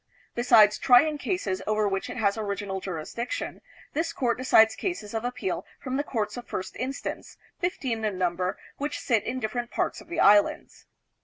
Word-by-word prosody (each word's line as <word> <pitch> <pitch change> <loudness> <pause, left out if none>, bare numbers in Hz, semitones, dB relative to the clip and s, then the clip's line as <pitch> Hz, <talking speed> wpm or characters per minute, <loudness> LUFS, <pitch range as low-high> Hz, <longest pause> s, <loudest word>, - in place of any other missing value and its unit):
Besides 225 -3 +5
trying 290 +4 +5
cases 215 - -2
over 215 0 +2
which 195 -1 -2
it - - -6
has 200 -4 +2
original 200 -3 -3
jurisdiction, 185 +7 -4 0.3
this 330 +2 -1
court 240 -6 +1
decides 225 -3 +5
cases 290 - -4
of 225 0 -2
appeal 250 +10 -2 0.2
from 260 -1 -4
the 285 - 0
Courts 215 -5 -3
of 245 - -8
First 185 0 -5
Instance, 265 +2 -5 0.2
fifteen 260 - -2
in 210 -3 -1
num 180 -2 +1
ber, 180 +1 -2 0.2
which 290 +1 -3
sit 225 -5 +1
in 255 +4 -3
different 240 +1 -3
parts - - -2
of - - -16
the 340 - -4
Islands. 205 0 +3
225 Hz, 175 wpm, -27 LUFS, 205-260 Hz, 0.3 s, Besides